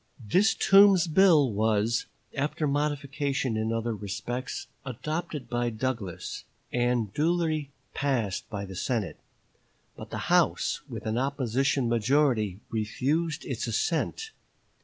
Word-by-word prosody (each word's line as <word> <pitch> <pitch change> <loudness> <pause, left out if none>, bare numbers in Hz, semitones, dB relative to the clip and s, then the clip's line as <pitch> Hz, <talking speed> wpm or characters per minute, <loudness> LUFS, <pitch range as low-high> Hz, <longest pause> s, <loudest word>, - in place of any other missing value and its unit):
This 180 - +2
Toombs 195 -2 +6
bill 160 -6 +5
was, 110 +2 +1 0.3
after 150 +2 -1
modification 140 -3 -1
in 110 +1 -1
other 115 0 -1
respects, 115 +5 -4 0.2
adopted 150 +2 -4
by 120 0 0
Douglas, 110 -6 -4 0.3
and 120 -4 +1
duly 160 -2 0 0.2
passed 120 -9 -1
by 100 -2 -4
the 95 -1 -9
Senate; 110 +1 -2 0.8
but - - -9
the - - -5
House - - +2
with - - -7
an 110 +2 0
opposition 135 -1 0
majority 115 -4 +2
refused 140 +9 -1
its 125 -3 -3
assent. 165 - -1
130 Hz, 115 wpm, -28 LUFS, 110-150 Hz, 0.8 s, Toombs